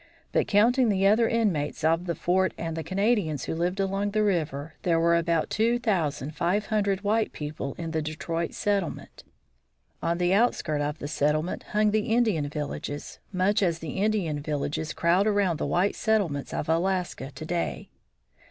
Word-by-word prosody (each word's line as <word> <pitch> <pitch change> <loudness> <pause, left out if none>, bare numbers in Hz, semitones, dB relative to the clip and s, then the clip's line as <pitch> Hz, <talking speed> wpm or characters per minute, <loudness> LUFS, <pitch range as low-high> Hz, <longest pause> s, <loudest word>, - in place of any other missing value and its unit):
But - - +1
counting 235 +4 +4
the 195 -1 +2
other 220 +3 +4
inmates 180 -11 0
of 165 +3 +2
the 170 - -1
fort 185 +4 +1
and 165 -1 -4
the 160 - -3
Canadians 190 - 0
who - - -3
lived 175 +4 -1
along 195 +1 0
the 215 +1 +1
river, 160 -6 -1
there 170 -2 +2
were 170 0 +4
about 170 -1 +1
two 230 +2 +2
thousand 160 - -1
five 190 +6 0
hundred 200 -3 0
white 215 +2 +1
people 150 -2 -5
in 165 -1 -4
the 160 -1 0
Detroit 165 +2 -3
settlement. 200 -4 -2 0.8
On 170 0 0
the 180 +1 +2
outskirts 175 -9 +1
of 150 +1 -2
the 145 - -5
settlement 155 +2 0
hung 210 0 +3
the 215 0 0
Indian 220 -11 +2
villages, 145 -1 -5
much 195 +2 +2
as 170 -4 +2
the 160 -1 -6
Indian 200 -8 0
villages 150 +1 -3
crowd 180 +5 +2
around 200 -5 +2
the - - -1
white 185 +3 +1
settlements 195 -11 0
of - - -3
Alaska 175 -4 0
to 155 +4 -7
day. 170 +1 -3
175 Hz, 170 wpm, -27 LUFS, 155-205 Hz, 0.8 s, counting